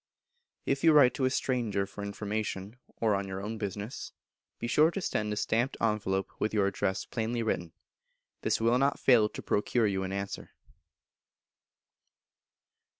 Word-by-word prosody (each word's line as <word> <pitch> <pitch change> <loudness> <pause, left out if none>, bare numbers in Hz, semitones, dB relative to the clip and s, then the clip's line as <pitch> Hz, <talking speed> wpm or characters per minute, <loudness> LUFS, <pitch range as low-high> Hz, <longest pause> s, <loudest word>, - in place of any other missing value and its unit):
If 135 0 0
you 165 -1 +7
write 140 -4 +7
to 130 - 0
a - - +3
Stranger 120 -7 0
for 100 +1 -9
information, 105 +1 -4 0.2
or 110 -2 +2
on 100 0 -1
your 95 0 -4
own 110 +3 -5
business, 105 +3 -5 0.4
be - - -5
sure 150 +7 +4
to 185 - -4
send 105 - -1
a - - -1
stamped 115 +5 0
envelope 100 -3 0
with 110 +1 -1
your 100 -2 +3
address 95 -1 -1
plainly 115 +1 -2
written; 85 -6 -2 0.7
this - - +1
will 115 +2 +3
not 140 +1 +2
fail 115 -5 +5
to - - -8
procure 110 +3 +1
you 95 -2 0
an 95 0 -3
answer. 100 0 -5
110 Hz, 155 wpm, -30 LUFS, 100-120 Hz, 0.7 s, you